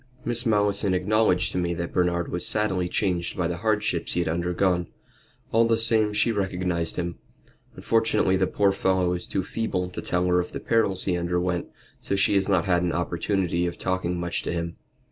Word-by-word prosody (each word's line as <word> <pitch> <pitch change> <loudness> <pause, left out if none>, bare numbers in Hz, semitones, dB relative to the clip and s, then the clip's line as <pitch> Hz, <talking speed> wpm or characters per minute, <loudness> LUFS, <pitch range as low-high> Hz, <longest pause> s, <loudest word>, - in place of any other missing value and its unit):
"Miss 120 0 +1
Malleson 100 -2 +2
acknowledged 95 -1 +2
to - - -1
me 85 -1 -1
that 85 0 -4
Bernard 85 -1 0
was 90 0 -2
sadly 95 -4 0
changed 90 -4 -1
by 90 -2 +1
the 85 0 -3
hardships 105 -4 0
he - - 0
had 85 - -2
undergone. 90 +1 0 0.6
All 115 +1 +4
the 115 -1 +2
same 110 -2 +3
she 105 +3 +2
recognized 90 -5 -1
him. 85 -1 -4 0.6
Unfortunately, 110 -4 +2
the 95 0 +2
poor 100 -1 +2
fellow 95 -2 +1
is 90 0 -4
too 95 - -1
feeble 90 -3 -2
to - - -5
tell 90 0 0
her 90 0 +3
of 90 - -4
the - - -4
perils 100 -5 +1
he 90 - 0
underwent, 90 0 -1 0.3
so 100 - -2
she 95 +1 +2
has 100 0 +2
not 90 -4 +2
had 90 -2 +2
an 90 -1 0
opportunity 85 0 -1
of 85 - -5
talking 90 -2 -2
much 85 0 -2
to - - -3
him." 85 0 -3
90 Hz, 195 wpm, -25 LUFS, 85-100 Hz, 0.6 s, All